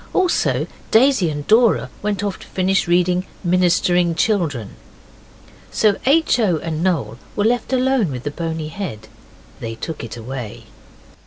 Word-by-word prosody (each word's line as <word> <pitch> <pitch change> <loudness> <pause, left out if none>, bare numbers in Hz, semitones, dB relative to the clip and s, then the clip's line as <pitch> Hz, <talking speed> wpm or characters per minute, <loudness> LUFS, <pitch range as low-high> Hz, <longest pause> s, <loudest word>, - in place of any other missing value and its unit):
Also 370 -2 +2 0.2
Daisy 230 -6 +4
and 145 -1 -5
Dora 225 +1 +3
went 205 -1 -2
off 200 -2 -3
to - - -13
finish 190 -1 0
reading 180 +1 +2 0.2
Ministering 175 -1 +2
Children. 160 - -1 0.9
So 210 -2 +2
H. 305 -2 +4
O. 190 -8 +2
and 160 0 -4
Noel 140 - -1 0.2
were 205 - +1
left 240 +2 0
with 250 - +1
the 145 - -3
bony 160 -1 -4
head. 135 - -6 0.5
They 115 -3 -5
took 155 +6 -6
it 115 0 -7
away. 120 -1 -7
180 Hz, 140 wpm, -20 LUFS, 145-210 Hz, 0.9 s, Daisy